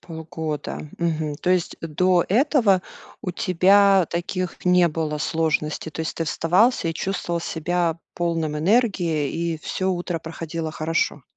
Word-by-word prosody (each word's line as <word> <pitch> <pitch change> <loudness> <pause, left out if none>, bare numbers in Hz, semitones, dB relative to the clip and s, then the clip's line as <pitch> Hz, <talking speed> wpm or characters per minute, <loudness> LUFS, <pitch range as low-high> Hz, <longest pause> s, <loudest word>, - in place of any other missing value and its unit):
Полгода. 160 -2 -5
Мгм. 160 -3 -1
То 180 - +1
есть, 180 -2 +1
до 175 +2 +2
этого 230 -4 +3 0.4
у 180 - -2
тебя 195 +1 +4
таких 175 +1 -3
не 180 -1 +5
было 155 -1 -2
сложностей. 160 0 -1
То 160 - -6
есть, 160 - -3
ты 165 - -1
вставал 180 +6 +2
и 165 - -2
чувствовал 175 -1 -2
себя 170 0 -1 0.2
полным 165 -3 -1
энергии. 175 - +1
И 165 -1 -2
всё 185 +4 -2
утро 175 -1 -2
проходило 165 0 -5
хорошо. 155 -2 -1
170 Hz, 135 wpm, -23 LUFS, 160-185 Hz, 0.4 s, не